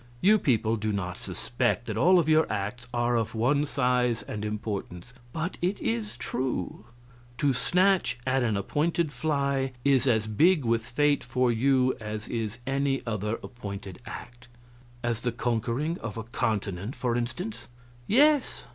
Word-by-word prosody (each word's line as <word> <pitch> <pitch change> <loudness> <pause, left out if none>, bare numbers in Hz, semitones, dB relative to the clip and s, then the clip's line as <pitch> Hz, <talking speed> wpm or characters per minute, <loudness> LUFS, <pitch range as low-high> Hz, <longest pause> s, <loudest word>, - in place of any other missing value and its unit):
You 210 - +5
people 115 - +2
do 110 0 -1
not 90 -3 -2
suspect 120 0 -2
that 110 - -3
all 175 +11 +5
of 165 -3 +3
your 155 0 +4
acts 105 +4 -3
are 120 0 +1
of 115 -1 -1
one 140 +6 +2
size 125 -4 +1
and 105 0 -5
importance, 105 -1 -4 0.2
but 165 +7 -3
it 185 +3 0
is 115 0 -2
true; 130 +1 -3 0.5
to 145 -3 +2
snatch 180 -2 +2
at 130 +1 +2
an 110 -4 +1
appointed 155 - 0
fly 140 -1 0
is 135 -2 +4
as 110 -4 +3
big 150 - +3
with 115 0 +2
fate 145 +5 +1
for 125 0 +1
you 130 +2 +3
as 105 0 -5
is 115 -1 -3
any 135 0 0
other 105 -1 -1
appointed 100 -6 -7
act 120 0 -9 0.3
" 120 0 -25
"As 120 -1 -1
the 120 - 0
conquering 120 +7 -1
of 115 -1 -6
a 115 - -3
continent, 105 -1 -2
for 120 -2 -1
instance?" 175 - -4 0.4
"Yes. 290 +4 +3
120 Hz, 155 wpm, -27 LUFS, 110-140 Hz, 0.5 s, You